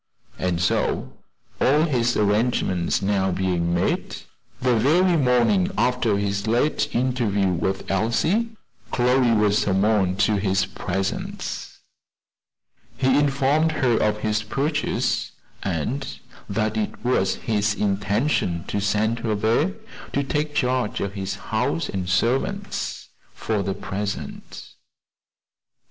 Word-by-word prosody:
And 90 -2 0
so 90 - 0 0.5
all 150 +4 +4
his 120 -6 +1
arrangements 105 -5 +1
being 95 - -2
now 95 -1 +1
made 90 -2 0 0.4
the 125 -2 +2
very 170 +10 +3
morning 145 - +3
after 125 -4 +2
his 100 +1 -2
late 145 +6 +1
interview 120 -6 +1
with 95 +3 -2
Elsie, 120 - +1 0.4
Chloe 125 0 +3
was 105 0 +3
summoned 95 -1 +1
to 105 +1 +3
his 95 -1 +1
presence. 95 0 -4 1.2
He 130 +1 +3
informed 145 +3 +2
her 125 -6 +2
of 105 0 +1
his 110 -1 0
purchase, 140 +8 -1 0.3
and 100 - -2 0.4
that 110 +1 -1
it 110 +2 -3
was 95 -6 +2
his 105 -1 0
intention 100 - 0
to 105 - -1
send 105 +3 0
her 110 -2 -1
there 115 - +1 0.4
to 140 - +1
take 150 +2 -2
charge 125 -3 0
of 100 -1 -3
his 95 -2 -4 0.2
house 80 - 0
and 90 -2 -3
servants, 115 +7 -1 0.3
for 110 -2 -1
the 95 0 -2
present. 100 0 -5
110 Hz, 115 wpm, -23 LUFS, 95-130 Hz, 1.2 s, all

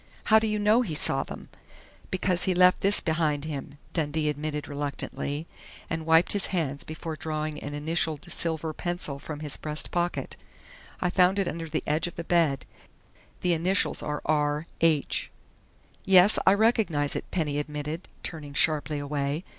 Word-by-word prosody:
"How 220 0 +6
do 220 - -1
you 215 0 0
know 210 +3 +4
he 180 -11 -3
saw - - +1
them?" - - -9 0.6
"Because 185 -1 +2
he 185 - +1
left 180 0 +5
this 200 +1 +3
behind 155 -3 0
him," 145 -2 -6 0.2
Dundee 155 -1 0
admitted 150 0 -3
reluctantly, 145 +1 -3 0.5
and 160 -1 -3
wiped 165 +1 +5
his 200 -2 +3
hands 145 -6 -2
before 155 +1 -6
drawing 155 -1 -3
an 145 0 -5
initialed 155 0 0
silver 160 -1 -1
pencil 175 -5 -4
from 150 +1 -7
his 150 -2 -4
breast 150 0 -2
pocket. 175 0 -2 0.6
"I 180 - +1
found 185 +1 +4
it 195 -2 +1
under 165 -1 -4
the 155 0 -2
edge 155 +3 +1
of 175 - -8
the 170 - -5
bed. 165 -6 +2 0.8
The 180 -1 +3
initials 180 +4 +2
are 150 0 -4
R. 150 0 +1 0.2
H." 160 -3 +2 0.7
"Yes, 190 +2 +7
I 190 - +7
recognize 200 - +2
it," - - -5
Penny 150 -5 -1
admitted, 150 +3 -5 0.2
turning 150 -4 -6
sharply 155 0 +2
away. 145 +2 -2
160 Hz, 160 wpm, -27 LUFS, 150-180 Hz, 0.8 s, Yes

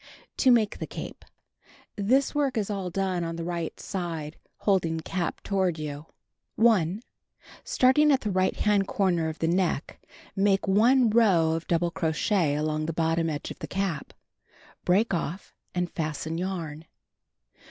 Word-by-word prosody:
To 260 - +4
Make 230 -4 +3
the - - -4
Cape - - -8 0.7
This 255 +7 +2
work 285 -4 0
is 210 -1 -1
all 195 -3 -3
done 185 -1 -1
on 165 0 -4
iho 165 - -4
right 170 -2 -4
side, 165 -5 -4 0.2
holding 170 -5 +1
cap 175 +1 -3
toward 190 -4 0
j'ou. 150 0 -6 0.5
1. 210 -3 +3 0.6
Starting 300 - +4
at 270 - +3
ilio 205 -4 -2
right 185 0 +2
hand 205 -2 +2
corner 175 -5 +1
of 160 - -6
the 165 - -1
neck, 175 -4 -1 0.3
make 195 0 +2
1 230 +4 +4
row 190 -8 +4
of 165 +1 -3
double 170 0 +1
crochet 160 -1 +1
along 155 +1 -1
the 165 - -2
bottom 165 0 +1
edge 145 -2 -4
of - - -9
the - - -6
cap. 190 -6 -3 0.7
Break 195 +5 +3
off 175 +2 -4 0.2
and 180 0 0
fasten 160 0 -3
yarn. 165 -4 -4
180 Hz, 150 wpm, -27 LUFS, 165-205 Hz, 0.7 s, To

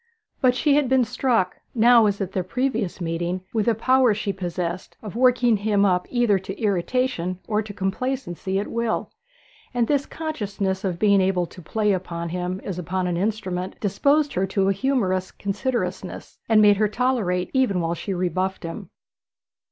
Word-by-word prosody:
But 250 -2 +4
she 290 +2 +2
had 285 -4 +2
been 260 -1 +4
struck, 235 -5 0 0.2
now 235 -1 +6
as 200 -1 -1
at 195 -2 -3
their 190 - -1
previous 225 -2 -2
meeting, 175 +1 -2
with 220 -2 0
the 230 - +3
power 255 0 +3
she 205 -1 -2
possessed 180 -1 -4
of 210 -1 -7
working 245 -2 +4
him 205 0 +2
up 180 -2 +1
either 240 -6 +2
to 190 +1 -8
irritation 200 -2 0
or 215 -1 +1
to 215 -1 -8
complacency 195 -1 -2
at 200 - -1
will; 235 -1 -2 0.6
and 240 -2 +2
this 285 -1 +1
consciousness 205 -11 -3
of 185 -3 -1
being 200 0 +4
able 185 -2 +1
to 180 - -13
play 210 +5 0
upon 170 -3 -3
him 180 +2 -3
as 185 -3 -4
upon 180 +2 -2
an 175 -1 -1
instrument 190 -2 -2
disposed 280 +9 +2
her 190 +1 0
to 195 0 +1
a - - +3
humorous 190 -7 0
considerateness, 195 -3 -4
and 215 -1 +6
made 205 -1 +6
her 215 +1 +3
tolerate 210 -6 0
even 255 -9 +2
while 165 0 0
she 185 +4 -5
rebuffed 185 +1 -1
him. 165 0 -6
200 Hz, 175 wpm, -23 LUFS, 185-240 Hz, 0.6 s, now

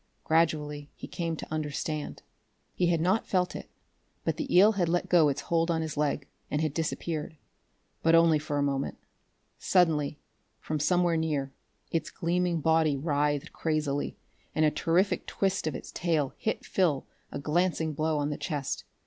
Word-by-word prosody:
Gradually 150 -3 +1
he - - -8
came 165 -1 -3
to - - -8
understand. 155 0 -3 0.5
He 180 - +1
had 170 -1 +2
not 190 +6 +2
felt 180 -2 +1
it, - - -7 0.5
but - - -1
the 285 -3 -4
eel 205 +4 +8
had 185 -5 0
let 175 +1 0
go 165 -4 +5
its 140 - -2
hold 165 0 +1
on 160 -1 +1
his 160 - -4
leg, 145 -2 0 0.2
and 150 - 0
had 155 -2 0
disappeared. 160 0 -3 0.6
But 165 0 +5
only 165 -2 +5
for 150 -1 -3
a 145 - +2
moment. 140 -1 -1 0.6
Suddenly, 155 -6 +2 0.4
from 155 -1 -3
somewhere 175 +2 +2
near, 145 -4 -1 0.4
its 165 - -1
gleaming 175 -1 0
body 160 -2 +3
writhed 145 -1 0
crazily, 150 -3 -1 0.4
and 155 - +4
a 150 - +4
terrific 180 +4 +1
twist 195 -4 0
of 155 - -2
its - - -7
tail 155 -5 0
hit 220 - -3
Phil 165 -8 +1 0.3
a - - -4
glancing 160 +1 0
blow 155 +1 0
on 145 0 0
the 145 - -3
chest. 145 -5 -3
160 Hz, 165 wpm, -29 LUFS, 150-170 Hz, 0.6 s, eel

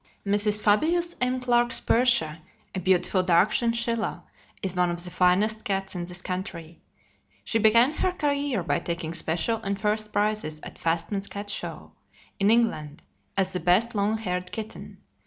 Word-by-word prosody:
Mrs. 205 +1 +1
Fabius 335 +12 +2
M. 255 0 +1
Clarke's 240 -1 +2
"Persia," 225 -11 +3 0.3
a 190 - -2
beautiful 185 +1 +2
dark 180 +3 +3
chinchilla, 230 -1 0 0.4
is 190 -1 -2
one 180 -1 +2
of 175 0 -3
the 180 - -5
finest 205 +5 +2
cats 195 -1 -2
in 175 -2 -4
this 180 0 -9
country. 175 -3 -6 0.6
She 225 - 0
began 230 +5 +5
her 365 +4 0
career 285 - 0
by - - 0
taking 170 -1 -4
special 170 +7 0
and 200 -1 -3
first 215 0 -1
prizes 205 -7 -1
at - - -11
Fastmay's 185 +4 -1
Cat 205 0 -6
Show - - -6 0.5
in 200 +1 +3
England, 215 -11 +1 0.3
as 190 -1 +1
the 180 - -1
best 185 +8 +2
long 210 +1 +1
haired 180 -4 -3
kitten. 220 0 -7
205 Hz, 155 wpm, -26 LUFS, 180-230 Hz, 0.6 s, began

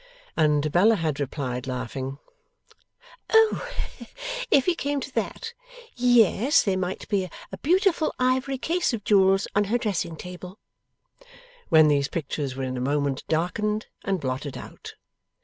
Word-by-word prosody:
and 150 -1 +2
Bella 210 +7 +5
had 160 -6 -2
replied 130 -2 -3
laughing. 130 +1 -4 1.1
O! 445 +2 +4 0.8
if 270 - +4
he 360 - +3
came 285 -3 -2
to 260 0 -7
that, 460 0 -3 0.4
yes, 245 - +4
there 195 -2 +1
might 185 0 -3
be 190 -3 0 0.2
a - - -6
beautiful 360 0 +2
ivory 260 +2 +1
case 335 +1 0
of 220 -3 -3
jewels 195 -1 +4
on 205 0 +2
her 225 +5 +1
dressing 200 -8 -2
table; 180 +3 -9 1.1
when 160 -3 +7
these 140 -2 +2
pictures 145 -4 -3
were 135 - -4
in 130 -1 -3
a - - -3
moment 140 0 0
darkened 210 +7 0 0.2
and 195 -2 0
blotted 130 0 -4
out. - - -10
185 Hz, 140 wpm, -25 LUFS, -, 1.1 s, when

